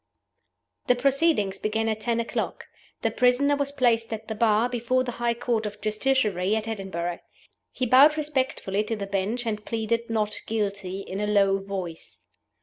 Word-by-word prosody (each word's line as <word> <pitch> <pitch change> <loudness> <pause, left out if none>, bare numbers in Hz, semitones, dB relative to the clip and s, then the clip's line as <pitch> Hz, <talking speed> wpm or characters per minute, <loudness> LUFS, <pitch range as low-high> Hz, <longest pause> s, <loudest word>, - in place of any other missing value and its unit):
THE 250 - +5
proceedings 270 -6 +2
began 220 +1 -1
at 220 -1 -1
ten 235 +1 0
o'clock. 230 - -3 0.4
The - - +2
prisoner 255 +3 +3
was 280 0 -1
placed 235 -5 +1
at 220 0 -5
the 220 - -3
Bar, 220 +1 +3
before 250 +1 0
the 250 - -3
High 235 0 +1
Court 235 -2 -1
of 210 0 -8
Justiciary, 215 -4 +1
at 220 0 -2
Edinburgh. 185 -5 -3 0.5
He 255 - -2
bowed 275 +6 +6
respectfully 265 -9 -1
to 225 - -2
the 200 -2 -4
Bench, 200 +5 -2
and 210 -2 -2
pleaded 230 +1 -2
Not 215 -2 -1
Guilty, 200 -3 -2
in 195 +1 -5
a 210 - 0
low 195 -2 +3
voice. 190 -4 -7
225 Hz, 165 wpm, -26 LUFS, 205-245 Hz, 0.5 s, bowed